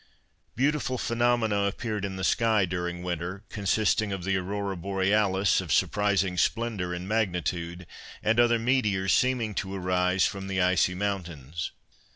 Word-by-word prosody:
Beautiful 135 -1 0
phenomena 115 -4 +1
appeared 105 0 -3
in 95 -1 -5
the 95 - -5
sky 110 -1 +3
during 90 0 -4
winter, 90 +3 -4
consisting 105 +1 +1
of 95 -2 -4
the 95 +1 0
Aurora 100 +1 -2
Borealis, 95 +1 +1
of - - -6
surprising 100 -3 +1
splendour 110 -4 0
and 90 +1 -5
magnitude, 90 -4 -2 0.4
and 110 +2 +2
other 120 0 +5
meteors 110 -6 +1
seeming 125 -4 +1
to 100 -1 -3
arise 90 0 +1
from 95 -1 -3
the 95 0 -1
icy 90 0 +2
mountains. 85 -6 -3
95 Hz, 140 wpm, -27 LUFS, 90-110 Hz, 0.4 s, other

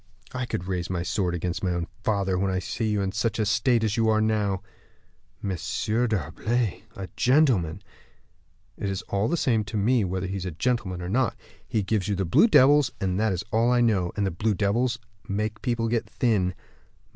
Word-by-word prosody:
"I 130 -1 -3
could 90 - -3
raise 90 -2 -2
my 90 -2 -2
sword 90 -1 -1
against 90 +2 -3
my 90 -2 +1
own 85 -1 -2 0.2
father, 100 -3 +1
when 95 0 +1
I 95 - 0
see 110 +4 -2
you 105 -2 0
in 95 - -1
such 110 +1 -1
a 110 - +1
state 115 +2 +2
as 110 -1 0
you 115 -1 +3
are 110 0 +3
now." 105 -3 0 0.8
"M. 100 - -2
d'Herblay, 110 - -1
a 95 -4 -6
gentleman!" 115 - +2 1.0
"It's 95 -1 -3
all 100 +2 -1
the 170 - 0
same 115 -7 +2
to 105 +2 -4
me 115 +3 +3
whether 95 0 -2
he's 95 0 -4
a 80 -3 -7
gentleman 105 -8 -1
or 90 - -4
not. 120 +2 +1 0.3
He 110 - 0
gives 100 -1 0
you 105 - 0
the 95 0 -1
blue 90 - +5
devils, 145 - +5
that 95 +3 0
is 95 0 -2
all 115 +2 +3
I 125 -1 +3
know. 100 -7 +2
And 100 - +1
the 95 - 0
blue 105 +5 0
devils 110 +5 +1 0.3
make 105 +2 -2
people 120 -3 0
get 115 0 -1
thin. 100 -7 +1
105 Hz, 195 wpm, -26 LUFS, 95-115 Hz, 1.0 s, blue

